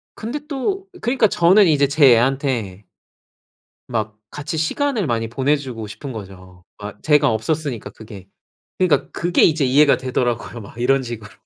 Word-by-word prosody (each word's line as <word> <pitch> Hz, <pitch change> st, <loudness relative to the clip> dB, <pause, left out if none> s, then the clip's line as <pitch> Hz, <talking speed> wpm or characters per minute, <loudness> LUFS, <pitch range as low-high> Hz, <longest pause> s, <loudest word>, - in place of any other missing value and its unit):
근데 235 Hz, +7 st, -5 dB
또 380 Hz, +7 st, -3 dB
그니까 240 Hz, -2 st, +2 dB
저는 190 Hz, +2 st, +4 dB
이제 145 Hz, -3 st, +3 dB
제 140 Hz, -3 st, +5 dB
애한테 120 Hz, -6 st, -1 dB, 1.0 s
막 110 Hz, -3 st, -3 dB
같이 150 Hz, +4 st, -5 dB
시간을 220 Hz, -, -1 dB
많이 115 Hz, -2 st, -1 dB
보내 135 Hz, +5 st, +1 dB
주고 125 Hz, -6 st, -7 dB
싶은 135 Hz, +6 st, -8 dB
거죠. 95 Hz, -4 st, -11 dB
아 105 Hz, 0 st, -7 dB
제가 150 Hz, -4 st, +3 dB
없었으니까 125 Hz, +2 st, -2 dB
그게. 105 Hz, -4 st, -12 dB, 0.5 s
그니까 170 Hz, -7 st, +1 dB
그게 175 Hz, +1 st, 0 dB
이제 155 Hz, -3 st, +3 dB
이해가 140 Hz, +3 st, +4 dB
되더라고요 120 Hz, -2 st, -3 dB
막 100 Hz, -, -13 dB
이런 135 Hz, +3 st, +2 dB
식으로. 115 Hz, -3 st, -8 dB
135 Hz, 320 characters per minute, -20 LUFS, 115-155 Hz, 1.0 s, 제